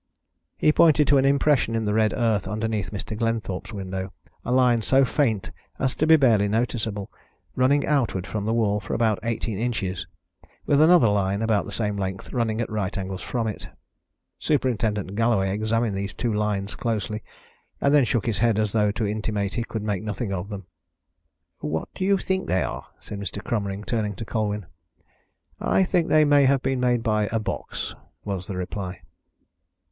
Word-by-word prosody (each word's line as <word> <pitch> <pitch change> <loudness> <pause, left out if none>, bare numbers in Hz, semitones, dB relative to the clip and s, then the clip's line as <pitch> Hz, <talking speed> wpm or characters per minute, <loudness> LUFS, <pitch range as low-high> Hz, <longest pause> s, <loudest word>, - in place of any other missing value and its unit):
He 150 - +4
pointed 150 -2 +5
to 140 -1 +6
an 135 - +2
impression 140 -4 +3
in 110 -1 0
the 105 - 0
red 110 0 +3
earth 110 -5 0
underneath 110 0 -2
Mr. 105 +1 -5
Glenthorpe's 115 -4 -2
window 95 -1 -5 0.3
a 125 - -3
line 125 -2 +4
so 135 +4 +4
faint 120 -8 0 0.3
as 130 -1 0
to 155 - 0
be 160 - +8
barely 115 -9 +4
noticeable, 110 -2 -1 0.4
running 140 +3 +3
outward 120 -11 0
from 105 0 -4
the 110 - +1
wall 105 -3 +2
for 105 - -4
about 110 -3 +2
eighteen 115 -3 -2
inches, 100 -8 -2 0.6
with 145 0 +4
another 165 -5 +6
line 100 0 +1
about 110 -2 +1
the - - -7
same 105 -2 -2
length 95 -1 -4
running 115 -3 0
at 115 - -3
right 105 -1 -2
angles 95 -1 -4
from 115 +3 -2
it. 110 -2 -4 0.7
Superintendent 110 -9 0
Galloway 105 -3 +2
examined 110 0 0
these 100 +1 -4
two 120 -3 -1
lines 105 -1 -1
closely 110 -2 -2 0.6
and 140 - +2
then 145 -2 +6
shook 115 -1 0
his 110 -5 -1
head 115 -1 +3
as 105 -1 +1
though 105 -1 +2
to 110 - -1
intimate 105 -1 -2
he 115 - -1
could 110 -2 -5
make 105 -3 -1
nothing 105 -1 -3
of 95 +1 -4
them. 100 -3 -7 0.9
"What 80 +1 -3
do 185 - -3
you 200 0 +4
think 190 0 -2
they 90 0 +1
are?" - - -5
said 100 - -7
Mr. 100 0 -5
Cromering, 100 -3 -2
turning 105 -4 -1
to 115 - -6
Colwyn. 105 -2 -2 0.9
"I 190 - +2
think 180 -2 +1
they 155 0 +5
may 145 -1 +5
have 135 -1 +3
been 135 -1 0
made 120 -2 +1
by 105 -2 +1
a 115 - +1
box," 110 - -4 0.3
was 95 -3 -4
the 95 - -4
reply. 90 0 -5
110 Hz, 185 wpm, -24 LUFS, 100-120 Hz, 0.9 s, be